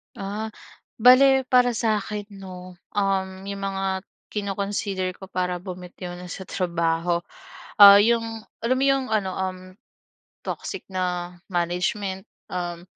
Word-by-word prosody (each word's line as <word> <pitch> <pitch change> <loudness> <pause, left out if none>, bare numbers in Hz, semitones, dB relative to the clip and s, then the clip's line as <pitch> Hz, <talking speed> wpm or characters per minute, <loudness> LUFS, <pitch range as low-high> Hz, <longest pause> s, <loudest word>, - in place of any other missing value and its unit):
Ah, 205 +3 -4 0.5
bale 265 +3 +7
para 245 -2 +5
sa'kin 210 -2 -1 0.2
'no, 185 -1 -10 0.2
um, 195 -1 +1 0.2
yung 200 0 -5
mga 195 -1 -1 0.3
kino-consider 200 -2 -2
ko 190 +1 -12
para 180 -1 -2
bumitiw 180 -1 -8
na 180 0 -9
sa 190 - -7
trabaho, 170 -1 0 0.6
ah, 200 0 +11
yung 230 +2 +3 0.4
alam 245 +3 +2
mo 270 - +2
yung 270 -1 +2
ano, 205 -4 +1
um, 185 -1 -3 0.9
toxic 390 - -4
na 180 -1 -3
management, 185 +3 -1 0.2
um, 175 -1 -4
190 Hz, 120 wpm, -24 LUFS, 180-210 Hz, 0.9 s, ah